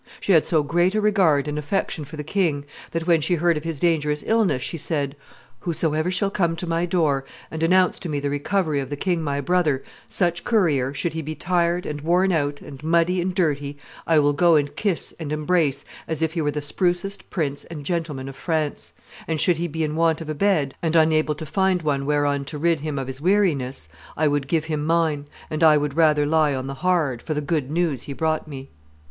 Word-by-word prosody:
She - - -1
had 160 -4 +5
so 155 -3 +2
great 175 +6 +1
a - - +3
regard 185 -9 +3
and 150 0 -2
affection 150 0 -2
for 150 +3 -10
the 150 - -4
king, 155 -4 0 0.2
that 165 -1 -3
when 165 -2 +3
she 175 +4 +1
heard 170 +1 +2
of 150 - -4
his 165 -3 -4
dangerous 150 -3 +1
illness 215 - +2
she - - -3
said, 145 -3 -1 0.4
'Whosoever 160 -1 0
shall 195 +2 +1
come 170 -4 0
to 175 - -3
my 165 +1 0
door, 155 -6 +1 0.3
and 160 - -5
announce 180 +2 +3
to 175 - -5
me 145 -2 -1
the 140 0 -2
recovery 155 +1 0
of 135 -1 -4
the 145 - -3
king 175 +3 -1
my 140 -2 -2
brother, 155 -4 +1 0.2
such 175 -1 0
courier, 155 - +2
should 160 +3 -2
he 160 - -3
be 155 +1 -5
tired, 175 0 0
and 150 -1 -4
worn 180 +4 +2
out, 145 -4 -1
and 140 0 -11
muddy, 170 +3 +2
and 180 +1 -2
dirty, 145 -5 0 0.3
I 165 - +4
will 145 -1 +4
go 170 +2 +4
and 145 -1 +1
kiss 200 -6 -1
and 155 -3 -5
embrace 150 -2 0 0.2
as 160 0 -2
if 160 0 0
he 170 - -1
were 145 - +1
the 145 0 -3
sprucest 180 +5 -1
prince 145 -5 -2
and 155 -4 -8
gentleman 155 -5 -3
of 135 - -8
France; 155 -1 -2 0.3
and, 160 -1 -1
should 175 0 +4
he 170 +1 -1
be 160 0 -3
in 150 0 -2
want 165 -1 +2
of 160 -2 -7
a - - -1
bed 150 -5 +1
and 165 -1 0
unable 155 -1 +3
to 160 - -7
find 190 +1 +1
one 140 -2 -1
whereon 145 -1 +1
to 150 +2 -5
rid 165 +1 +1
him 150 -1 -4
of 135 - -2
his 130 +1 -7
weariness, 155 - +1 0.3
I 155 - +2
would 145 -1 0
give 160 +1 0
him 155 -2 -2
mine, 160 -2 +1 0.3
and 155 +1 -1
I 155 -2 +7
would 145 -1 -2
rather 155 -3 +4
lie 150 -2 +2
on 130 0 -4
the 135 - -4
hard, 155 -6 0
for 155 - -3
the - - 0
good 145 -2 -1
news 155 -5 0
he 140 - -6
brought 155 +2 -1
me. 135 -2 -9
155 Hz, 225 wpm, -23 LUFS, 145-170 Hz, 0.4 s, I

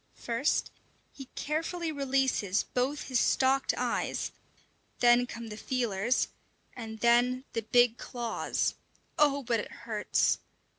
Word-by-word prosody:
First 240 +5 0 0.4
he 270 - -9
carefully 325 +2 -2
releases 270 -8 +1
both 265 +4 -1
his 255 -2 0
stalked 270 +1 +2
eyes, - - -1 0.7
then 240 0 +5
come 230 -1 -7
the 210 - -7
feelers, 235 -2 0 0.5
and 220 -2 -7
then 245 +2 +3
the 230 - -1
big 240 +1 +3
claws. 240 -2 -2 0.5
Oh, 285 -2 +4
but 235 -2 +1
it - - -5
hurts! 215 -3 0
245 Hz, 115 wpm, -30 LUFS, 230-270 Hz, 0.7 s, then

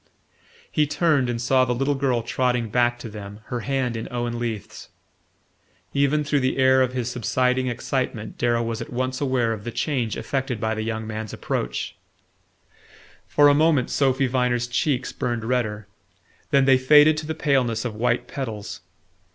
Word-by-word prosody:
He 150 -1 +2
turned 150 -5 +2
and 120 -1 -2
saw 130 +2 +3
the 125 -1 0
little 135 +3 +1
girl 130 -4 0
trotting 125 -1 0
back 120 +2 +2
to 120 - -8
them, 105 -1 -9
her 120 - -1
hand 130 -1 -1
in 110 - -4
Owen 120 -1 -3
Leath's. 115 -4 -5 1.0
Even 140 +2 +2
through 145 0 +1
the 130 0 0
stir 130 0 +4
of 130 -1 +1
his 125 -1 -2
subsiding 125 +2 0
excitement 120 -2 -3
Darrow 120 -1 +1
was 115 -1 -3
at - - -7
once 130 +2 -2
aware 130 -5 +1
of 105 -2 -7
the 120 - -4
change 120 -3 -2
effected 130 -4 -2
by 110 +1 0
the 110 - -3
young 110 0 -3
man's 110 -1 -5
approach. - - -3 1.3
For 145 0 +5
a 145 - +6
moment 150 -3 +3
Sophy 135 -1 +2
Viner's 125 -1 +1
cheeks 125 +2 -1
burned 120 -2 -3
redder; 110 -4 -1 0.6
then 135 -1 +4
they 130 -1 +5
faded 150 +3 +6
to 155 -1 -4
the 160 - -3
paleness 130 -7 +1
of 120 - -2
white 120 +3 0
petals. 105 -8 -6
125 Hz, 170 wpm, -23 LUFS, 115-135 Hz, 1.3 s, a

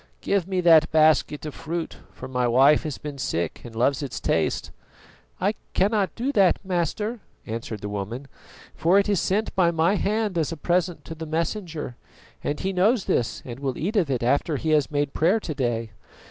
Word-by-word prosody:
Give 195 -3 0
me 190 -2 0
that 165 -3 +6
basket 155 -1 +3
of 150 - -5
fruit, 165 +1 -5
for - - -9
my 125 -1 0
wife 135 +5 +5
has 150 - -3
been 145 -2 -7
sick 85 -9 -2
and 120 -2 -10
loves 130 +5 +2
its 140 -4 -4
taste." - - 0 0.7
"I - - +1 0.2
cannot 200 0 +1
do 255 +4 -1
that, 195 -8 +4
Master," 195 +6 -1 0.3
answered 110 -1 -5
the 105 - -4
woman, 105 +7 -5 0.5
"for 175 +4 +3
it 200 - +3
is 200 -4 +2
sent 210 +6 0
by 180 -3 +4
my 170 +4 +2
hand 210 -3 0
as 160 0 0
a 165 - -5
present 175 -1 0
to 160 - -6
the 160 0 -7
Messenger, 165 - -3 0.5
and 145 - -2
he 190 +1 -1
knows 200 +4 +2
this 120 - -1
and 120 0 -7
will 135 -3 -3
eat 200 +8 -2
of 180 -8 +2
it 125 -3 -1
after 145 +5 +1
he 160 +3 -1
has 150 -2 +3
made 145 -2 -1
prayer 180 +8 +3
to 165 - -5
day. 115 -4 -2
160 Hz, 195 wpm, -24 LUFS, 135-185 Hz, 0.7 s, that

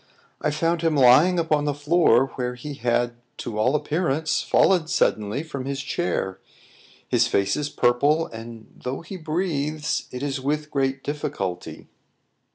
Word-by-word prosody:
"I 150 - +1
found 165 +3 0
him 165 -2 +1
lying 145 +7 +6
upon 155 -3 +1
the 145 -1 0
floor, 145 -4 +4
where 125 -1 -3
he 145 +4 -7
had, 120 -1 0 0.2
to 110 -3 -5
all 125 +7 +2
appearance, 155 0 0
fallen 180 -5 +3
suddenly 110 -3 0
from 140 -5 -6
his 140 0 -3
chair. 140 - -2 0.7
His - - +3
face 100 0 +1
is 150 -1 -2
purple, 145 +5 +2
and 115 -2 -11
though 130 +2 -3
he 180 +3 -8
breathes, 155 -3 -2
it 125 +2 -6
is 140 -2 -2
with 150 +2 -2
great 135 -1 -1
difficulty." 100 -11 -4
145 Hz, 150 wpm, -24 LUFS, 125-155 Hz, 0.7 s, lying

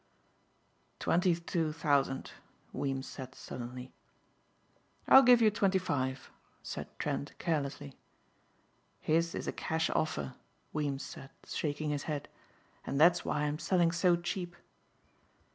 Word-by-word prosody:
"Twenty 175 0 +2
two 165 -1 -1
thousand," 140 -4 0 0.4
Weems 135 -1 -2
said 130 -1 -8
sullenly. 125 +1 -7 1.1
"I'll 265 - +10
give 245 -2 +6
you 215 - +6
twenty 195 -2 +2
five," 135 -8 -2 0.3
said - - -5
Trent 145 - -3
carelessly. 140 - -2 1.1
"His 165 +2 +1
is - - -4
a - - 0
cash 160 0 -1
offer," 155 -4 -1 0.4
Weems 145 -3 -1
said 135 - -9 0.2
shaking 150 0 -2
his 145 -1 -1
head, 145 -2 -3 0.6
"and 140 - -2
that's 175 +2 +6
why 150 - -1
I'm 150 +1 -1
selling 175 -3 +2
so 175 +1 +3
cheap." 175 0 -4
155 Hz, 120 wpm, -32 LUFS, 140-175 Hz, 1.1 s, I'll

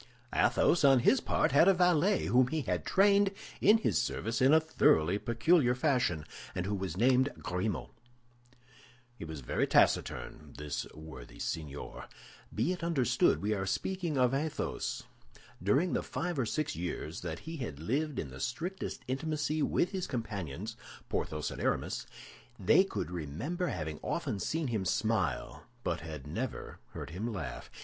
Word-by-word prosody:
Athos, 170 - +3
on 135 -3 +6
his 135 - +4
part, - - +1
had 145 +6 +6
a 195 - +6
valet 180 +2 +3
whom 125 0 +4
he 155 +3 -1
had 90 -8 -2
trained 200 0 +5 0.3
in 210 +3 +7
his 220 - +1
service 115 +2 -2
in 130 +2 +6
a 160 - +7
thoroughly 100 - +3
peculiar 125 +3 +3
fashion, 125 - +1 0.3
and 90 - -1
who 100 - -1
was 95 -3 -3
named 130 +4 +4
Grimaud. 90 +4 -2 1.2
He 100 - -8
was 80 -3 -7
very - - 0
taciturn, 75 -2 +1
this 75 -1 -4
worthy 75 -6 -10
signor. 75 -3 -5 0.5
Be 115 +11 0
it 180 -2 -4
understood 145 - +2
we 105 +1 +1
are 95 -2 -2
speaking 175 - -1
of 125 -1 +3
Athos. 150 +3 -2 0.6
During 135 - +2
the - - +1
five 175 -4 -3
or 120 - +1
six 155 - -1
years 85 -1 -4
that 80 -3 -4
he 160 - -7
had 115 - -5
lived 140 - -1
in 70 - -4
the 65 - -9
strictest 170 - -4
intimacy 155 +3 -1
with 175 - +1
his 190 -3 -3
companions, 105 - -4 0.3
Porthos 75 -1 -2
and - - -6
Aramis, - - -1 0.5
they - - +5
could 80 - -4
remember 90 - -3
having 80 - -4
often 100 - -2
seen 155 - -1
him 110 -5 -1
smile, 95 - -1 0.2
but - - -1
had 75 -4 -8
never 110 - -5
heard - - -6
him 105 +8 -3
laugh. 90 -11 -6
120 Hz, 155 wpm, -32 LUFS, -, 1.2 s, in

